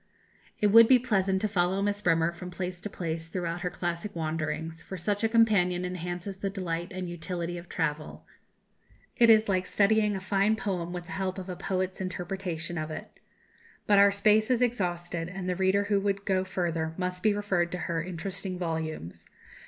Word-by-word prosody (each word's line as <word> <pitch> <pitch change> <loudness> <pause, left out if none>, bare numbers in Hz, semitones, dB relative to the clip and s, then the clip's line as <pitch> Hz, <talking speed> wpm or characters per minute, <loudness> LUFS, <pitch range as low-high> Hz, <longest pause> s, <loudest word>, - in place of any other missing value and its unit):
It 210 -1 +3
would 230 +1 +9
be 260 - +7
pleasant 195 -6 +1
to 215 - +1
follow 190 -1 +1
Miss 205 +1 0
Bremer 165 -2 +3
from 175 +1 -8
place 180 0 -5
to 210 - -5
place 165 -3 -4
throughout 170 0 -3
her 180 - -1
classic 175 +3 -4
wanderings, 160 0 -3
for 190 - -7
such 205 +5 -1
a 225 - +3
companion 195 -6 +3
enhances 180 +2 -4
the 195 0 -2
delight 175 -3 -3
and 185 -1 -4
utility 175 0 -4
of 175 - -13
travel; 155 -2 -3 0.9
it 235 -2 +5
is 220 -1 +6
like 185 -2 +1
studying 210 0 +3
a - - -2
fine 200 +3 +2
poem 180 -5 -3
with 175 0 -5
the - - -11
help 190 -1 -2
of 190 0 -6
a 180 - -3
poet's 185 +1 -2
interpretation 180 -2 -4
of 155 0 -4
it. 155 - -8 0.7
But 205 -1 +5
our 200 0 +7
space 210 +2 +3
is 250 -1 +3
exhausted, 175 -7 -1
and 180 0 -5
the 180 - 0
reader 190 +2 +2
who 205 0 +1
would 200 0 -1
go 185 -1 +2
further 165 -3 -2
must 180 -1 -3
be 210 0 +3
referred 180 -4 0
to - - -1
her 170 -2 -2
interesting 185 +2 -5
volumes. 160 - -4
185 Hz, 190 wpm, -28 LUFS, 170-200 Hz, 0.9 s, would